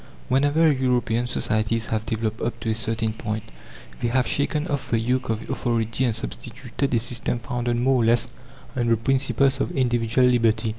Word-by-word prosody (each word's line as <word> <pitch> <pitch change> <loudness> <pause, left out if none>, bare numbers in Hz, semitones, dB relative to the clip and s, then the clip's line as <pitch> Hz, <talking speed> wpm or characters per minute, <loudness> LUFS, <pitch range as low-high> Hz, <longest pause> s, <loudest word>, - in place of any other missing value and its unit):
Whenever 145 +4 +4
European 125 -3 +1
societies 110 -2 0
have 110 -1 -1
developed 110 0 -2
up 120 - -2
to 115 - -1
a - - +2
certain 110 0 -1
point, 110 -1 -4 0.6
they 120 - 0
have 125 +1 +2
shaken 150 +2 0
off 145 -5 -3
the 115 - +2
yoke 125 +3 0
of 110 0 -2
authority 115 0 -1
and 115 -3 0
substituted 60 - -4
a 120 - +3
system 120 +1 -2
founded 120 0 -2
more 125 +1 +2
or - - +2
less 120 +1 +3 0.5
on 120 -2 0
the 115 -1 +3
principles 135 +2 +2
of - - 0
individual 120 -1 +2
liberty. 115 -2 +2
120 Hz, 180 wpm, -24 LUFS, 110-130 Hz, 0.6 s, Whenever